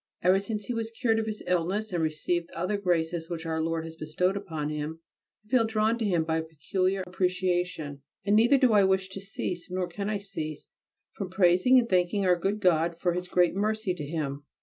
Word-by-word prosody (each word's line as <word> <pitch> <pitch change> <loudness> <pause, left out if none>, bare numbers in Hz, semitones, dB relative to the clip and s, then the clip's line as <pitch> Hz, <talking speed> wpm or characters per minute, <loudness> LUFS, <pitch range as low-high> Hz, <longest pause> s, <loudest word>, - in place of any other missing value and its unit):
Ever 185 +2 +5
since 210 +1 -4
he 245 - -3
was 225 -1 -2
cured 225 -1 +1
of 220 - -2
his 215 -1 -5
illness 185 +4 0
and 170 - 0
received 165 +2 -1
the - - -12
other 180 +5 0
graces 170 -4 0
which 165 -1 -5
Our 160 0 -1
Lord 165 0 -1
has 165 0 -8
bestowed 165 +5 0
upon 160 -7 -3
him 150 +1 -4 0.5
I - - -26
feel 255 -2 +4
drawn 220 +1 +1
to 225 - 0
him 175 -5 +2
by 160 0 0
a - - -3
peculiar 185 +5 -1
appreciation: 180 -5 -1 0.2
and 205 0 +3
neither 235 +6 +6
do 255 -4 +4
I 205 -1 +6
wish 190 0 +2
to 190 - -7
cease, 190 -2 -5
nor 180 0 -1
can 200 +4 -4
I 210 - 0
cease, 160 -7 -6 0.4
from 195 -3 -5
praising 185 +6 +5
and 240 -2 +3
thanking 185 +1 +2
our 180 -1 +5
good 195 +4 -1
God 170 -3 +2
for 175 -1 +1
His 180 +1 -3
great 180 -1 +3
mercy 210 0 0
to 170 -4 -6
him. 145 -2 -3
180 Hz, 215 wpm, -28 LUFS, 165-205 Hz, 0.5 s, neither